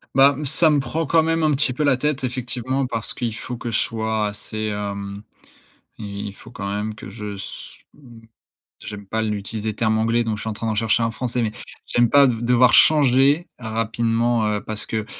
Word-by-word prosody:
Bah, 135 Hz, +1 st, +7 dB
mmh, 150 Hz, -, -4 dB
ça 155 Hz, +3 st, +4 dB
me 150 Hz, -1 st, +3 dB
prend 160 Hz, +6 st, -2 dB
quand 160 Hz, +2 st, +3 dB
même 165 Hz, +1 st, 0 dB
un 155 Hz, -1 st, +3 dB
petit 135 Hz, -1 st, +2 dB
peu 150 Hz, +4 st, -1 dB
la 140 Hz, -2 st, +4 dB
tête 135 Hz, 0 st, -1 dB
effectivement 130 Hz, +1 st, -2 dB
parce 115 Hz, -3 st, -3 dB
qu'il 120 Hz, -3 st, -3 dB
faut 125 Hz, +2 st, -5 dB
que 120 Hz, 0 st, -5 dB
je 110 Hz, -, +1 dB
sois 110 Hz, -1 st, -1 dB
assez 105 Hz, +1 st, -5 dB
hem, 100 Hz, -1 st, -5 dB, 0.7 s
i 100 Hz, -1 st, -6 dB
il 100 Hz, -, -7 dB
faut 110 Hz, +3 st, -14 dB
quand 100 Hz, -5 st, -5 dB
même 105 Hz, +2 st, -3 dB
que 105 Hz, -, -10 dB
je 105 Hz, -2 st, -6 dB
se 95 Hz, -, -9 dB, 0.2 s
m 120 Hz, -6 st, -15 dB, 0.6 s
j'aime 100 Hz, -1 st, -8 dB
pas 110 Hz, +3 st, -2 dB
l'utiliser 105 Hz, 0 st, -3 dB
terme 110 Hz, 0 st, +1 dB
anglais 115 Hz, +2 st, +2 dB
donc 110 Hz, -2 st, -2 dB
je 105 Hz, -, -8 dB
suis -, -, -4 dB
en -, -, -3 dB
train 110 Hz, +2 st, -4 dB
d'en 110 Hz, -, -1 dB
chercher 115 Hz, +2 st, +2 dB
un 115 Hz, -, +1 dB
français 120 Hz, +2 st, -2 dB
mais 110 Hz, -, 0 dB, 0.4 s
j'aime 120 Hz, 0 st, +2 dB
pas 140 Hz, -1 st, +6 dB
de 115 Hz, -3 st, -1 dB
devoir 125 Hz, +1 st, +4 dB
changer 145 Hz, +2 st, +5 dB
rapidement, 115 Hz, 0 st, 0 dB
heu, 105 Hz, -1 st, -1 dB
parce 110 Hz, 0 st, -4 dB
que, 110 Hz, -1 st, -2 dB
115 Hz, 215 wpm, -22 LUFS, 110-130 Hz, 0.7 s, Bah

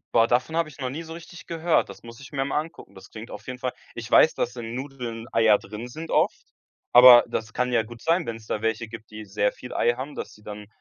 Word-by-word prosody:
Boah, 115 Hz, 0 st, +5 dB
davon 125 Hz, +7 st, 0 dB
hab 165 Hz, -1 st, +1 dB
ich 150 Hz, -, -14 dB
noch 130 Hz, -2 st, -3 dB
nie 155 Hz, +5 st, -5 dB
so 165 Hz, 0 st, -9 dB
richtig 170 Hz, +1 st, -12 dB
gehört. 165 Hz, 0 st, +1 dB
Das -, -, -12 dB
muss 115 Hz, 0 st, -11 dB
ich 140 Hz, -, -12 dB
mir 135 Hz, -1 st, -1 dB
mal 140 Hz, +2 st, 0 dB
angucken. 165 Hz, +2 st, -9 dB
Das 95 Hz, -, -14 dB
klingt 110 Hz, +1 st, -10 dB
auf 105 Hz, 0 st, -10 dB
jeden 125 Hz, -, -5 dB
Fall 125 Hz, -1 st, -3 dB, 0.2 s
Ich 115 Hz, -1 st, -7 dB
weiß, 160 Hz, -, +6 dB
dass 120 Hz, -, -2 dB
in 115 Hz, -1 st, -6 dB
Nudeln 125 Hz, -4 st, -6 dB
Eier 110 Hz, -2 st, +5 dB
drin 110 Hz, +4 st, -8 dB
sind 160 Hz, +6 st, -8 dB
oft, -, -, +1 dB, 0.5 s
aber 125 Hz, -1 st, +10 dB
das 110 Hz, -1 st, -4 dB
kann 125 Hz, +2 st, -1 dB
ja 115 Hz, -, +4 dB
gut 115 Hz, +2 st, -11 dB
sein, 165 Hz, +1 st, +1 dB
wenn's 115 Hz, -1 st, -6 dB
da 110 Hz, -, -3 dB
welche 115 Hz, 0 st, -1 dB
gibt, 110 Hz, -1 st, -11 dB
die 110 Hz, 0 st, -9 dB
sehr 105 Hz, +1 st, 0 dB
viel 125 Hz, -, -10 dB
Ei 120 Hz, -, +2 dB
haben, 135 Hz, +4 st, -6 dB
dass -, -, -6 dB
sie 105 Hz, -, -20 dB
dann 105 Hz, 0 st, -9 dB
120 Hz, 260 wpm, -25 LUFS, 110-140 Hz, 0.5 s, aber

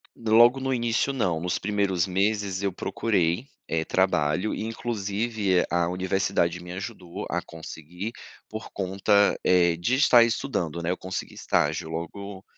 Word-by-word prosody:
Logo 120 Hz, +3 st, +5 dB
no 135 Hz, 0 st, -1 dB
início 120 Hz, +2 st, 0 dB
não, 90 Hz, -11 st, 0 dB
nos 90 Hz, +2 st, -1 dB
primeiros 100 Hz, -3 st, 0 dB
meses 100 Hz, 0 st, 0 dB
eu 100 Hz, -2 st, -1 dB
procurei, 95 Hz, +2 st, 0 dB, 0.2 s
eh, 80 Hz, 0 st, -1 dB
trabalho 90 Hz, 0 st, +1 dB
e -, -, -4 dB
inclusive 110 Hz, -3 st, -1 dB
a 85 Hz, -1 st, +2 dB
universidade 90 Hz, -1 st, 0 dB
me 90 Hz, 0 st, -8 dB
ajudou 95 Hz, -2 st, -6 dB
a -, -, -1 dB
conseguir, 85 Hz, +5 st, -8 dB, 0.4 s
por 110 Hz, +1 st, -7 dB
conta, 100 Hz, +2 st, +2 dB
eh, 85 Hz, -2 st, +3 dB
de 90 Hz, +10 st, +1 dB
estar 130 Hz, -3 st, +6 dB
estudando, 90 Hz, -, -2 dB
né, 85 Hz, -, 0 dB
eu 90 Hz, -, -2 dB
consegui 95 Hz, 0 st, -5 dB
estágio 75 Hz, +2 st, 0 dB
logo, 95 Hz, +4 st, -6 dB
95 Hz, 145 wpm, -26 LUFS, 85-110 Hz, 0.4 s, estar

